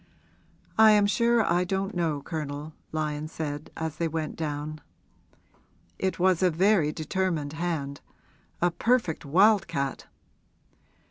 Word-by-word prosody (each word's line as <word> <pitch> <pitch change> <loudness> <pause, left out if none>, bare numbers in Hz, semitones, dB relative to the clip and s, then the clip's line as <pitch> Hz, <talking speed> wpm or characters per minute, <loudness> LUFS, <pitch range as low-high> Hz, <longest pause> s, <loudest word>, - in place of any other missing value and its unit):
'I 220 0 +9
am 205 -1 +5
sure 235 +2 +3
I 175 +1 +2
don't 195 +2 -2
know, 160 -5 -1
Colonel,' 150 -1 -5 0.2
Lyon 155 -1 -2
said 150 -1 -5
as 160 -1 -4
they 170 - 0
went 160 -1 -3
down. 150 -1 -4 1.2
'It 190 0 -1
was 185 -1 +3
a 185 - +5
very 175 -2 +3
determined 160 -2 -2
hand 160 -4 -3 0.6
a 175 - +4
perfect 225 -6 0
wild 195 +7 +4
cat.' 140 -5 -3
165 Hz, 125 wpm, -27 LUFS, 150-190 Hz, 1.2 s, I